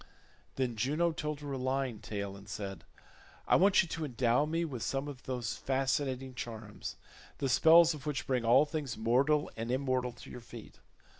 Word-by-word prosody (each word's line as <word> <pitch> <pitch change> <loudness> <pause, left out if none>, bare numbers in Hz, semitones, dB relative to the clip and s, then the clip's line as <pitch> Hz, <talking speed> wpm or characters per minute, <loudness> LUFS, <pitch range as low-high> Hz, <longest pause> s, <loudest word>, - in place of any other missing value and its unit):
Then 125 -3 -1
Juno 150 +10 +1
told 150 -2 -4
her 145 -1 -6
a 135 - -3
lying 130 -3 -1
tale 100 -2 -5
and 100 +1 -13
said, 95 -5 -6 0.6
"I - - +5
want 195 +1 +5
you - - -7
to 160 -1 -3
endow 125 +1 +2
me 165 +2 0
with 130 -7 -5
some 135 +4 -2
of 140 -3 -8
those 120 -5 -2
fascinating 135 -1 -1
charms, 110 -3 -6 0.4
the 135 - -1
spells 165 +5 +6
of 150 -1 -9
which 150 -2 -2
bring 125 -3 0
all 125 +6 +6
things 145 -5 -4
mortal 135 +7 +2
and 115 +1 -4
immortal 130 -1 0
to 120 - -12
your 125 - -8
feet. 115 -1 -12
130 Hz, 180 wpm, -32 LUFS, 115-145 Hz, 0.6 s, spells